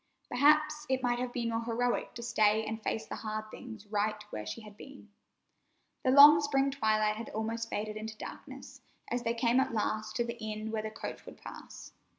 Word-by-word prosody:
Perhaps 300 +2 +3
it 260 -1 0
might 240 0 +1
have 250 0 -2
been 235 -1 -2
more 230 0 -1
heroic 240 +1 -1
to 235 - -6
stay 220 -2 +3
and 220 +1 -4
face 220 +1 -2
the - - -6
hard 215 0 -5
things 225 -4 -10
right 210 +1 -1
where 105 0 -5
she 105 - -5
had 210 -1 -12
been. 270 -1 -13 0.9
The 260 - +2
long 290 +3 +9
spring 275 -1 +1
twilight 215 -5 +1
had 225 - -6
almost 225 +1 -3
faded 215 +1 -3
into 220 0 -6
darkness - - -9 0.3
as 245 0 0
they 230 0 -1
came 235 +2 +3
at 265 -3 0
last 215 +2 -1
to 240 - +1
the 235 0 -6
inn 215 0 -4
where 220 -1 -1
the 215 - -4
coach 215 - -7
would - - -10
pass. - - -11
225 Hz, 200 wpm, -31 LUFS, 215-250 Hz, 0.9 s, long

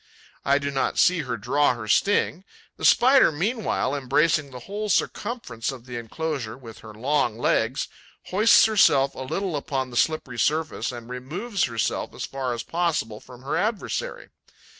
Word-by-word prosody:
I 140 +1 +3
do 140 0 -2
not 135 -1 -1
see 180 -1 +4
her 125 -6 -3
draw 145 +6 +2
her 115 -2 -7
sting. 190 - +2 0.3
The - - -3
Spider, 260 -5 +6
meanwhile, 190 - -1
embracing 145 +2 +1
the 125 -2 -10
whole 210 - -5
circumference 205 - -1
of 125 -3 -11
the 125 -2 -8
enclosure 120 -1 -4
with 115 -4 -12
her 110 - -11
long 120 +1 0
legs, 115 +2 0 0.4
hoists 215 +5 +6
herself 145 -11 +4
a - - -8
little 180 +6 -3
upon 135 -3 -3
the - - -9
slippery 130 -3 0
surface 155 +2 0
and 120 -2 -9
removes 165 - -3
herself 115 -3 -2
as - - -4
far 130 -3 -3
as 115 - -5
possible 165 -11 -1
from 125 0 -15
her 135 - -2
adversary. 215 - -2
140 Hz, 160 wpm, -24 LUFS, 125-175 Hz, 0.4 s, Spider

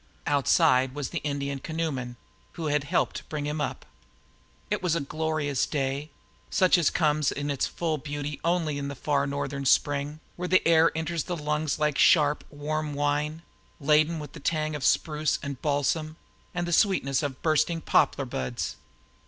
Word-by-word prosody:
Outside 140 -2 +3
was 145 -3 -3
the - - -2
Indian 140 -1 -3
canoeman 140 -6 -3 0.4
who 165 - -5
had 145 -1 +1
helped - - 0
to - - -8
bring 150 -2 -4
him 150 +1 -2
up. - - -3 0.9
It - - 0
was 175 -3 +1
a - - +1
glorious 155 -1 -1
day, 140 +1 -2 0.4
such 185 -3 +4
as 165 - +3
comes 150 -3 +2
in 145 0 -3
its 140 - 0
full 160 -3 -2
beauty 145 0 -5
only 165 -4 0
in 140 - -3
the 140 - -5
far 140 +1 0
northern 140 0 -3
spring, 145 +2 +1 0.2
where 180 +1 -3
the 185 -1 +3
air 165 0 +5
enters 160 -1 -2
the 175 - -3
lungs 150 -1 -1
like 150 -2 0
sharp, 150 -2 +5
warm 150 0 -3
wine, 150 +2 -1 0.4
laden 155 +2 +3
with 150 -1 -7
the 165 - -9
tang 155 +1 -1
of 145 - -5
spruce 150 0 +2
and 140 -2 -5
balsam, 155 +2 0 0.3
and 175 -1 -2
the 175 - -1
sweetness 150 -10 +2
of 145 -3 -2
the 130 - -25
bursting 165 +1 +2
poplar 140 -3 +2
buds. 65 - -4
150 Hz, 175 wpm, -27 LUFS, 140-160 Hz, 0.9 s, air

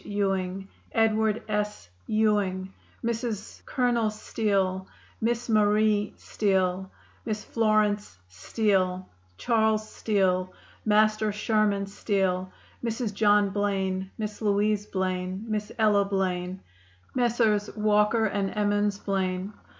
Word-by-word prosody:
Ewing, 195 -2 -2 0.3
Edward 220 -1 +2
S. 210 - -2 0.2
Ewing, 200 -3 +1 0.3
Mrs. 230 -3 -3
Colonel 240 -4 +1
Steele, 195 -3 -1 0.3
Miss 235 +1 0
Marie 210 -1 +2
Steele, 190 -2 0 0.3
Miss 215 -2 -3
Florence 215 - +1
Steele, 185 - 0 0.3
Charles 220 - +1
Steele, 185 -5 0 0.3
Master 215 0 +3
Sherman 210 -1 +1
Steele, 190 -2 -1 0.3
Mrs. 230 -2 -2
John 205 -1 +3
Blaine, 190 -2 -1
Miss 210 -1 -5
Louise 210 0 +1
Blaine, 185 +1 -2
Miss 210 -1 -3
Ella 210 -2 +4
Blaine, 185 -2 -2 0.5
Messrs. 230 -4 +2
Walker 210 +1 +3
and 200 -2 0
Emmons 205 -1 +1
Blaine. 190 0 -2
205 Hz, 95 wpm, -27 LUFS, 190-215 Hz, 0.5 s, Ella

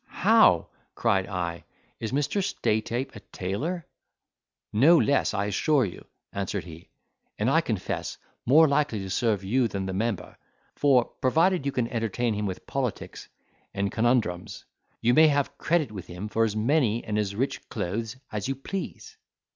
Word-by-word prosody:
"How!" - - +4 0.3
cried 95 -1 +1
I, 85 -3 -3 0.4
"is 110 - -4
Mr. 145 +9 0
Staytape 115 -1 -1
a - - -7
tailor." 125 - -4 0.9
"No 145 +11 +6
less, 140 -2 +2
I 100 0 0
assure 130 +7 +2
you," 90 - -8 0.3
answered 100 -1 -3
he, 85 -1 -12 0.5
"and, - - +1
I - - +4
confess, - - -3 0.3
more 155 +6 +6
likely 140 -4 +1
to 95 -1 -5
serve 105 -3 +1
you 120 +5 +2
than 100 -3 -4
the 95 - -3
member; 110 0 -2 0.4
for, 130 -4 +4
provided 160 +3 +1
you - - +1
can 125 -3 0
entertain 115 0 -1
him 105 0 -2
with 95 - -6
politics 130 -5 -4 0.5
and 100 0 -1
conundrums, 115 -7 0 0.4
you 120 +2 +3
may 155 +4 +7
have 145 -2 0
credit 155 -7 +1
with 95 -5 -8
him 90 +4 -6
for 115 +2 +2
as 105 -2 -2
many 120 0 +2
and 105 0 -1
as 100 -2 -2
rich 130 +6 -3
clothes 110 +2 -3 0.2
as 105 -2 -3
you 135 - -1
please." 195 - -6
115 Hz, 160 wpm, -27 LUFS, 100-140 Hz, 0.9 s, may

